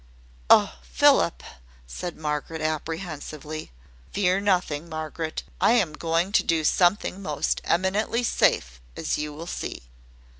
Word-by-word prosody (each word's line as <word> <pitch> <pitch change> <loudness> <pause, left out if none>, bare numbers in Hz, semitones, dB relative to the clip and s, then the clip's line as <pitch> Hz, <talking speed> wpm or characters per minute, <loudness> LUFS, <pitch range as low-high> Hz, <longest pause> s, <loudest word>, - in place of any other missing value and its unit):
"Oh, 65 - +5
Philip!" - - +3 0.4
said 170 - -6
Margaret, 150 +1 -3
apprehensively. 155 -1 -4 0.4
"Fear 190 -1 +2
nothing, 180 -6 0
Margaret. 160 0 -4 0.2
I - - +5
am 190 -10 +2
going 165 +4 0
to - - +4
do 165 -1 +1
something 180 +3 +2
most 150 -6 -1
eminently 200 +7 +1
safe, 60 - +1 0.2
as - - -1
you 150 0 -3
will 155 +3 -8
see." 170 - -5
160 Hz, 120 wpm, -25 LUFS, 150-185 Hz, 0.4 s, Oh